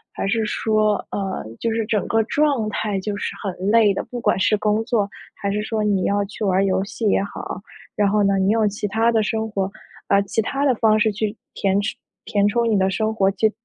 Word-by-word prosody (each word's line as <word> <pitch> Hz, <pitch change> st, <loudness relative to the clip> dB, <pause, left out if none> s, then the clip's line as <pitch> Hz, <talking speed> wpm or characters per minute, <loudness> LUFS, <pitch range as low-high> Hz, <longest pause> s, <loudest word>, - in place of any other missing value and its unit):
还 -, -, -2 dB
是 220 Hz, +2 st, +1 dB
说 215 Hz, 0 st, +1 dB, 0.2 s
呃， 195 Hz, -2 st, -3 dB, 0.2 s
就 230 Hz, -, -1 dB
是 225 Hz, 0 st, 0 dB
整 210 Hz, -3 st, 0 dB
个 225 Hz, -, +2 dB
状 280 Hz, -4 st, +1 dB
态 205 Hz, -2 st, -2 dB
就 205 Hz, +1 st, -3 dB
是 -, -, -4 dB
很 195 Hz, -, -1 dB, 0.2 s
累 225 Hz, -2 st, +5 dB
的， -, -, -2 dB
不 245 Hz, -1 st, -7 dB
管 190 Hz, -, +2 dB
是 210 Hz, +3 st, +3 dB
工 210 Hz, +2 st, 0 dB
作， 220 Hz, -4 st, 0 dB, 0.2 s
还 200 Hz, -, -3 dB
是 210 Hz, +1 st, -1 dB
说 220 Hz, -1 st, -1 dB
你 200 Hz, -3 st, +1 dB
要 200 Hz, 0 st, +1 dB
去 205 Hz, +2 st, -7 dB
玩 195 Hz, -, +2 dB
儿 -, -, +3 dB
游 190 Hz, -1 st, +1 dB
戏 215 Hz, +2 st, -2 dB
也 195 Hz, -, +2 dB
好？ 200 Hz, -, -6 dB, 0.4 s
然 205 Hz, -, +2 dB
后 210 Hz, +1 st, +2 dB
呢， 195 Hz, 0 st, +2 dB
你 190 Hz, +1 st, +2 dB
用 220 Hz, -1 st, +3 dB
其 205 Hz, +1 st, -3 dB
他 225 Hz, +3 st, +2 dB
的 220 Hz, -2 st, +2 dB
生 220 Hz, +1 st, -2 dB
活， 195 Hz, -2 st, -2 dB, 0.4 s
呃， 200 Hz, -, +5 dB
其 200 Hz, +3 st, -3 dB
他 275 Hz, +6 st, 0 dB
的 255 Hz, -, +3 dB
方 215 Hz, -1 st, +3 dB
式 215 Hz, 0 st, +3 dB
去 210 Hz, +1 st, -2 dB, 0.2 s
填 195 Hz, +1 st, +1 dB
充 210 Hz, -, -3 dB, 0.3 s
填 205 Hz, -1 st, +2 dB
充 235 Hz, +2 st, +1 dB
你 215 Hz, -, +3 dB
的 190 Hz, 0 st, +2 dB
生 220 Hz, +3 st, 0 dB
活 195 Hz, -2 st, +3 dB
就 215 Hz, +3 st, +2 dB
210 Hz, 255 characters per minute, -22 LUFS, 200-220 Hz, 0.4 s, 累